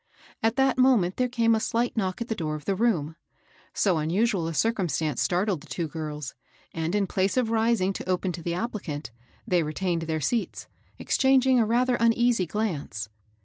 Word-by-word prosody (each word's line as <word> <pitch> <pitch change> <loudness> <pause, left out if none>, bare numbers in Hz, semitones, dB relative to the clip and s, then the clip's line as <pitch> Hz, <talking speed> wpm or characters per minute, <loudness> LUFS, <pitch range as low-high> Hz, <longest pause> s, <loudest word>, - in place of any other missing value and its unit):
At 225 0 +1
that 270 -1 +2
moment 235 -9 +3
there 250 0 +1
came 230 -2 +2
a 220 - +2
slight 235 +2 -1
knock 190 -2 -2
at 235 - -3
the 225 - -1
door 155 -7 -3
of 150 -2 -9
the 195 - +1
room. 185 -8 0 0.6
So 185 -6 +1
unusual 180 +3 +1
a 165 - -3
circumstance 165 - 0
startled 180 -2 0
the 160 - -15
two 170 -2 -2
girls; 150 -2 -6 0.4
and, 165 +3 -2
in 205 -1 +2
place 190 +4 0
of 235 -3 +1
rising 225 -4 +2
to 185 - -7
open 185 0 0
to 170 0 -7
the 170 +1 -2
applicant, 180 - -4 0.3
they 180 -6 +2
retained 165 +2 -2
their 160 -1 -2
seats, 225 - -2 0.3
exchanging 265 -1 +3
a 225 - +2
rather 245 +2 +2
uneasy 230 -4 +2
glance. 155 - -3
195 Hz, 185 wpm, -26 LUFS, 165-230 Hz, 0.6 s, moment